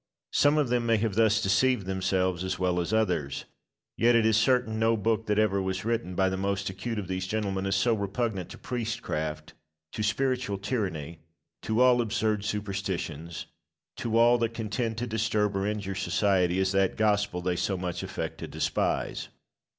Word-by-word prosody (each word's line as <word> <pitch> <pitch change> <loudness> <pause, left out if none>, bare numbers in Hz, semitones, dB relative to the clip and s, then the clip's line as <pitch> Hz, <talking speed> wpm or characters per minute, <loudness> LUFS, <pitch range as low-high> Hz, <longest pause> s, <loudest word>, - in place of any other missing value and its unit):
Some 145 +1 +4
of 145 -5 +2
them 120 -1 +1
may 115 -1 +4
have 110 -1 0
thus 110 +1 +3
deceived 120 +2 +2
themselves 95 -1 0
as 95 - -2
well 90 -1 +1
as 85 - -2
others. 90 -11 0 0.5
Yet 120 +1 +4
it 115 -1 +4
is 110 -1 +4
certain 110 -1 +2
no 115 0 +3
book 110 +1 0
that 105 0 +1
ever 100 -2 +2
was 95 +1 -3
written 115 -6 -1
by 95 +1 +3
the 95 0 -1
most 100 0 -1
acute 110 +5 -4
of 100 -3 -3
these 95 0 -3
gentlemen 100 -2 -1
is 95 - +1
so 115 +5 +3
repugnant 100 -1 -2
to - - -9
priestcraft, 80 -10 -4 0.4
to - - -4
spiritual 125 0 0
tyranny, 95 - -3 0.4
to 110 +2 0
all 125 -1 +5
absurd 110 -2 0
superstitions, 95 -6 -3 0.5
to 115 -1 -1
all 120 +1 +5
that 115 0 -1
can 110 -2 -4
tend 115 -1 -1
to 120 - -2
disturb 110 -2 0
or 95 +1 0
injure 105 -2 -2
society, 95 -1 +1
as 95 0 +2
that 95 -1 +1
Gospel 105 -4 +1
they 90 0 0
so 95 +2 -1
much 90 -1 -3
affect - - -5
to - - -5
despise. - - -1
105 Hz, 180 wpm, -28 LUFS, 95-115 Hz, 0.5 s, all